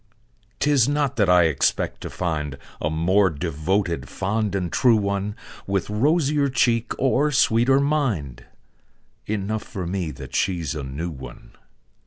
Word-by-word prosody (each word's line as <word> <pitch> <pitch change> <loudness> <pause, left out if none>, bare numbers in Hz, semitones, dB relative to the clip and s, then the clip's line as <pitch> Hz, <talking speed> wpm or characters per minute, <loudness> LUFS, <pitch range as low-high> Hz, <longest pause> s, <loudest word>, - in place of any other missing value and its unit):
'Tis 145 -3 +3
not 145 -2 0
that 100 -5 +2
I 90 -1 +6
expect 80 -5 0
to - - -5
find 75 -5 -3 0.2
A 75 - 0
more 95 +5 +3
devoted, 85 -1 -2
fond 105 +1 -1
and 90 -3 -2
true 120 -3 +4
one, 100 0 -1 0.3
With 100 +1 -1
rosier 145 +4 +2
cheek 120 -2 +1
or 145 +3 +2
sweeter 135 -1 +3
mind 110 - -1 0.8
Enough 105 +1 -2
for 95 -3 -6
me 90 -1 -2
that 65 - -9
she's 85 -4 0
a 75 - -4
new 70 +6 -5
one. 65 -4 -11
100 Hz, 140 wpm, -23 LUFS, 80-120 Hz, 0.8 s, I